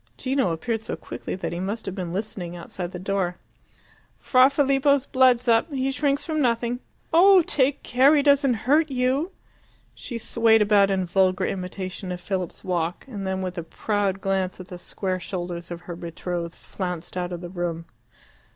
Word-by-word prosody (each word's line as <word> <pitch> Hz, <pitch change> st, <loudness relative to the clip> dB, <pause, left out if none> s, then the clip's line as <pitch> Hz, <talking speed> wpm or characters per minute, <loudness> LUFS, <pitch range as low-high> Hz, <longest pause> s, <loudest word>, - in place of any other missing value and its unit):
Gino 260 Hz, -7 st, 0 dB
appeared 220 Hz, +7 st, -2 dB
so -, -, -4 dB
quickly -, -, -6 dB
that 185 Hz, -, -4 dB
he 170 Hz, -, -4 dB
must 205 Hz, +5 st, -3 dB
have 195 Hz, -, -4 dB
been 180 Hz, -3 st, -4 dB
listening 185 Hz, -3 st, -4 dB
outside 175 Hz, +1 st, -6 dB
the 180 Hz, -, -6 dB
door. 185 Hz, -1 st, -1 dB, 0.8 s
"Fra 255 Hz, 0 st, +5 dB
Filippo's 280 Hz, -1 st, +2 dB
blood's 255 Hz, -2 st, +3 dB
up. 230 Hz, +7 st, +3 dB
He 270 Hz, -1 st, 0 dB
shrinks 285 Hz, +1 st, 0 dB
from 310 Hz, -2 st, -1 dB
nothing. 240 Hz, -1 st, 0 dB, 0.3 s
Oh, 370 Hz, +2 st, +7 dB
take 275 Hz, -2 st, +1 dB
care 265 Hz, +5 st, +5 dB
he 285 Hz, -, +3 dB
doesn't 280 Hz, -3 st, +4 dB
hurt 305 Hz, +4 st, +4 dB
you!" 265 Hz, +6 st, 0 dB, 0.6 s
She 240 Hz, -, -6 dB
swayed 225 Hz, -1 st, +3 dB
about 205 Hz, -1 st, +4 dB
in 190 Hz, -1 st, 0 dB
vulgar 185 Hz, +1 st, +2 dB
imitation 185 Hz, 0 st, -4 dB
of 180 Hz, -, -4 dB
Philip's 185 Hz, -1 st, -4 dB
walk, 175 Hz, -1 st, -2 dB
and 200 Hz, -7 st, -5 dB
then, 190 Hz, 0 st, -2 dB
with 180 Hz, -1 st, -4 dB
a -, -, -4 dB
proud 195 Hz, +2 st, -1 dB
glance 190 Hz, -1 st, -1 dB
at 185 Hz, -, -10 dB
the 180 Hz, -, -8 dB
square 185 Hz, +1 st, -3 dB
shoulders 175 Hz, -1 st, -5 dB
of 175 Hz, 0 st, -6 dB
her 175 Hz, -1 st, -7 dB
betrothed, 170 Hz, 0 st, -5 dB
flounced 180 Hz, -3 st, -6 dB
out 180 Hz, -1 st, -2 dB
of 175 Hz, -1 st, -5 dB
the 175 Hz, -, -7 dB
room. 175 Hz, -2 st, -3 dB
195 Hz, 180 wpm, -24 LUFS, 180-260 Hz, 0.8 s, Oh